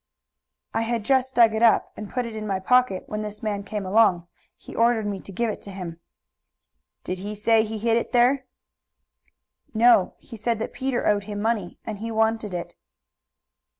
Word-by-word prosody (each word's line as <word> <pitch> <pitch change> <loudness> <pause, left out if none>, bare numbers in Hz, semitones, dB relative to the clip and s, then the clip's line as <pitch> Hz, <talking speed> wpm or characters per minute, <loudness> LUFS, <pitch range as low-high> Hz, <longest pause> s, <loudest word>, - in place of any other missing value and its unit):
"I - - +1
had 230 -1 -2
just 260 0 +2
dug 230 -2 +6
it 220 - -1
up 230 -2 +4
and 210 -2 -7
put 250 -1 -2
it 230 -1 -7
in 215 -1 -5
my 195 -2 -1
pocket 250 -1 +2
when 210 0 -4
this 210 +2 -6
man 205 -2 -1
came 205 0 -5
along. 190 -3 +3 0.3
He - - -12
ordered 230 -2 +3
me 200 -2 -3
to 195 - -11
give 225 +4 -1
it - - -8
to - - -10
him." 175 -3 -7 1.0
"Did 185 0 -4
he 205 +2 -5
say 220 +1 +3
he 220 0 -4
hid 225 +1 +2
it 235 - -2
there?" 250 +2 +3 1.3
"No. 225 -4 +5
He 235 - -12
said 230 +2 -1
that 220 - -5
Peter 260 -2 -2
owed 205 -1 +2
him 205 -1 -5
money, 215 -4 -1
and 215 -3 -5
he 225 +2 -4
wanted 220 -1 0
it." 175 - -5
220 Hz, 190 wpm, -24 LUFS, 205-235 Hz, 1.3 s, dug